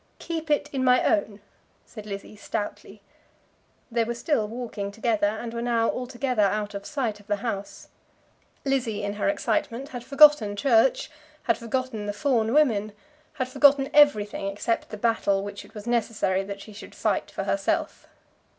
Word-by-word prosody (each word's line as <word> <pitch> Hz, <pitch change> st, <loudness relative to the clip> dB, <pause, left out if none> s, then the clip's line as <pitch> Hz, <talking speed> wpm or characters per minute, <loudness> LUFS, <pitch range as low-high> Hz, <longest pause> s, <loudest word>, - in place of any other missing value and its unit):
"Keep 325 Hz, -2 st, -5 dB
it 295 Hz, -1 st, +2 dB
in 265 Hz, -1 st, -1 dB
my 250 Hz, 0 st, +4 dB
own," 205 Hz, 0 st, 0 dB, 0.4 s
said 215 Hz, -3 st, -11 dB
Lizzie 200 Hz, +1 st, -7 dB
stoutly. 205 Hz, 0 st, -6 dB, 0.9 s
They 230 Hz, 0 st, +2 dB
were 235 Hz, +1 st, -3 dB
still 235 Hz, -3 st, 0 dB
walking 220 Hz, -3 st, -5 dB
together, 220 Hz, -1 st, +1 dB
and 225 Hz, +2 st, -4 dB
were 235 Hz, -, -3 dB
now 235 Hz, -1 st, +1 dB
altogether 250 Hz, -1 st, -2 dB
out 205 Hz, +1 st, +1 dB
of 200 Hz, 0 st, -6 dB
sight 245 Hz, -8 st, -2 dB
of 205 Hz, -, -19 dB
the 205 Hz, -, +1 dB
house. 205 Hz, -2 st, -5 dB, 0.8 s
Lizzie 240 Hz, -6 st, 0 dB
in 205 Hz, 0 st, -2 dB
her 205 Hz, +7 st, 0 dB
excitement 250 Hz, -1 st, -1 dB
had 245 Hz, -4 st, -7 dB
forgotten 275 Hz, -5 st, +6 dB
church, 230 Hz, +5 st, +3 dB, 0.3 s
had 230 Hz, -, +2 dB
forgotten 230 Hz, -2 st, -3 dB
the 205 Hz, -, -2 dB
Fawn 230 Hz, -3 st, +1 dB
women, 225 Hz, -8 st, +2 dB, 0.4 s
had 260 Hz, -4 st, -2 dB
forgotten 275 Hz, +1 st, +4 dB
everything 215 Hz, -9 st, +4 dB
except 210 Hz, +3 st, -2 dB
the 215 Hz, -, -7 dB
battle 205 Hz, -3 st, +1 dB
which 205 Hz, 0 st, -7 dB
it -, -, -19 dB
was 210 Hz, 0 st, -8 dB
necessary 220 Hz, -5 st, 0 dB
that 200 Hz, 0 st, -7 dB
she 215 Hz, -, -11 dB
should 205 Hz, -, -11 dB
fight -, -, -1 dB
for -, -, -4 dB
herself. -, -, -1 dB
230 Hz, 165 wpm, -25 LUFS, 205-255 Hz, 0.9 s, forgotten